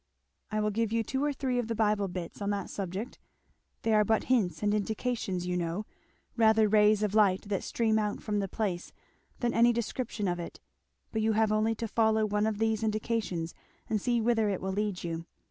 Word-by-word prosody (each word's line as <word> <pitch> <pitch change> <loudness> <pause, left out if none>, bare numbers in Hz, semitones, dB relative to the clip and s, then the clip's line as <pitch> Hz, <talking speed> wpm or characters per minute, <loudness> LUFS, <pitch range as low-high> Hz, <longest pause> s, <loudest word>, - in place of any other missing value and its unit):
"I 215 0 -1
will 210 0 +1
give 225 +1 0
you 230 0 +1
two 265 +5 -2
or 295 - +2
three 260 -3 -1
of 240 - -2
the 230 - -2
Bible 210 -2 +2
bits 180 +1 -6
on 200 - -1
that 200 -2 -2
subject; 195 +5 -5 0.6
they 225 - +2
are 210 0 +5
but 220 +1 +2
hints 215 -8 +1
and 205 0 +2
indications 210 -3 -1
you 180 0 -1
know 175 +4 -2 0.5
rather 220 -1 +5
rays 210 0 +4
of 210 -1 0
light 200 -4 +4
that 195 -2 0
stream 220 -2 +1
out 210 -1 -1
from 210 -1 -2
the 195 - -1
place 185 -3 -3 0.5
than 240 -1 +1
any 235 +1 +5
description 230 -2 -2
of 175 -1 -1
it; 170 - -7 0.5
but 220 - -1
you 220 0 +2
have 220 0 +2
only 215 +1 +2
to 230 - -3
follow 220 0 +2
one 210 0 +1
of 215 -2 -1
these 220 0 +1
indications 215 -6 -1 0.3
and 215 -2 0
see 240 +2 +1
whither 225 -2 +2
it 195 - -1
will 190 0 -3
lead 205 -2 -2
you. 165 -1 -4
215 Hz, 210 wpm, -30 LUFS, 200-225 Hz, 0.6 s, are